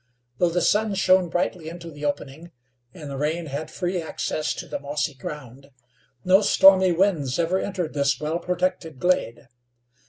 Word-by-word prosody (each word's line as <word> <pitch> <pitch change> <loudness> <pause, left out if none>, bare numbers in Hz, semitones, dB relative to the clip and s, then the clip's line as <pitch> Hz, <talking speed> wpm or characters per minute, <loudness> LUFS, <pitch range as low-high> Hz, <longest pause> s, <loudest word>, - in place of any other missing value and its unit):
Though 175 - +3
the 175 0 0
sun 210 -1 +2
shone 185 -2 +3
brightly 175 -1 -2
into 170 0 -9
the 145 0 -7
opening, 145 +3 -4 0.4
and 155 -5 -10
the 140 -1 -6
rain 160 +3 -1
had 150 +2 -5
free 180 +1 -2
access 155 -1 -3
to - - -7
the - - -4
mossy 145 +1 -2
ground, 135 0 -9 0.6
no 190 +2 +5
stormy 190 -2 +6
winds 170 -7 +1
ever 175 +2 +1
entered 185 -6 -3
this 140 -2 +1
well 155 +3 -2
protected 180 -3 -2
glade. 175 -7 0
165 Hz, 160 wpm, -24 LUFS, 145-180 Hz, 0.6 s, stormy